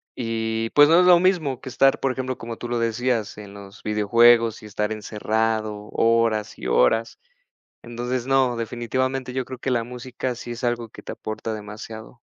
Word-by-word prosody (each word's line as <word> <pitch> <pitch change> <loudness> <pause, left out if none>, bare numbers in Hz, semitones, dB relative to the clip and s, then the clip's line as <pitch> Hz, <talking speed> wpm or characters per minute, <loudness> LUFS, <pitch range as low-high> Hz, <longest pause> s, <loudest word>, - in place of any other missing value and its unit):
y, 115 -1 -2
pues 145 0 +8
no 165 +2 +6
es 180 - +5
lo 175 -1 +8
mismo 170 -8 +1
que 130 - -8
estar, 135 +1 +3
por 135 - 0
ejemplo, 130 0 -4
como 115 0 -7
tú 120 - -6
lo 120 - -1
decías, 115 -1 -1
en 100 -1 -11
los 100 0 -12
videojuegos 115 +2 +4
y 105 - -10
estar 105 +1 -2
encerrado 110 0 -2
horas 115 -2 +1
y - - -5
horas. 60 - +2 0.7
Entonces, 120 +1 -4
no, 130 -2 +3
definitivamente, 125 +3 -2
yo 130 0 -2
creo 130 +1 -8
que 130 - -3
la 120 -2 +1
música 125 +1 -5
sí 120 0 -7
es 120 +2 -8
algo 120 -2 -1
que - - -12
te - - -8
aporta 110 +1 -5
demasiado. 110 +2 -9
115 Hz, 185 wpm, -23 LUFS, 110-130 Hz, 0.7 s, pues